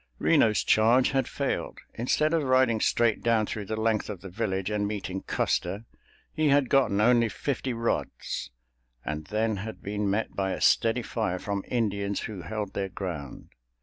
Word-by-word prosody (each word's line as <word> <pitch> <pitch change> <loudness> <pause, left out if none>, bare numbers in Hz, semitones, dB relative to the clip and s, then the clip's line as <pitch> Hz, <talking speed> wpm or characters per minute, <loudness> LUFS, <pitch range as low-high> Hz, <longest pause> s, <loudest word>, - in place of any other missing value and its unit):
Reno's 105 -2 +3
charge 115 +4 +4
had 135 -1 +1
failed—instead 150 +6 -1
of 165 - +3
riding 130 -4 +3
straight 115 -2 +2
down 115 -2 +2
through 105 0 -5
the 110 +2 -3
length 110 -1 0
of 100 -4 -6
the 95 - -9
village 95 -1 -2
and 105 -1 0
meeting 95 -2 -4
Custer, 105 +4 -1 0.5
he 155 -1 +2
had 140 -2 +3
gotten 135 -7 +3
only 115 +1 +4
fifty 135 +3 -3
rods, 115 - -2 0.6
and 75 0 -4
then 110 +2 0
had 110 +3 -7
been 105 0 -1
met 105 +3 -1
by 95 -1 0
a - - -4
steady 115 +1 +3
fire 110 -6 -2
from 100 +1 -3
Indians 100 -4 -1
who 105 -5 -6
held 100 +4 -4
their 95 -1 -2
ground. 85 -9 -6
110 Hz, 165 wpm, -27 LUFS, 100-115 Hz, 0.6 s, charge